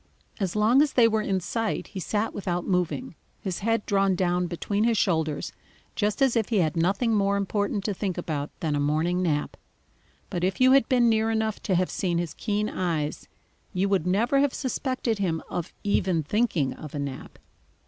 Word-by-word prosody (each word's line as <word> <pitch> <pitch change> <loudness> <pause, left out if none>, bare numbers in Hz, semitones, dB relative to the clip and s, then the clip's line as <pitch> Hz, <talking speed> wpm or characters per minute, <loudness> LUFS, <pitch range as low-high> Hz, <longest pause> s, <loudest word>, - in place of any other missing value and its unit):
As 190 -3 -1
long 220 +6 +5
as 295 -2 +2
they 235 -2 +6
were 220 -1 +1
in 195 -2 0
sight, 225 +5 -2
he 195 - -6
sat 210 +4 -1
without 180 -3 -2
moving, 180 +7 -1 0.3
his 190 -5 -4
head 225 +1 0
drawn 195 -1 +2
down 180 0 +1
between 195 +5 -1
his 230 -1 +2
shoulders 160 -6 0 0.4
just 210 +4 +1
as 265 -3 +3
if 225 -3 +1
he 225 - +1
had 160 -5 +1
nothing 195 +8 +1
more 200 -1 +2
important 200 0 -1
to 205 - -1
think 190 -2 -3
about 155 -4 -3
than 155 -3 0
a - - 0
morning 155 +5 +1
nap. 150 -5 -1 0.8
But 175 - -2
if 190 +1 0
you 255 0 +6
had 270 -3 +5
been 245 -2 +4
near 220 -1 +2
enough 220 -1 -1
to 190 - 0
have 180 +1 +1
seen 175 -3 -1
his 170 -2 -2
keen 210 -1 -1
eyes, 160 -7 -2 0.5
you 185 +2 +1
would 190 -4 +1
never 230 +9 +2
have 280 -1 +2
suspected 255 -4 -2
him 165 -5 -1
of 175 0 -3
even 185 -5 +1
thinking 165 - 0
of 150 -1 -9
a - - -2
nap. 140 -2 -6
195 Hz, 195 wpm, -26 LUFS, 175-220 Hz, 0.8 s, they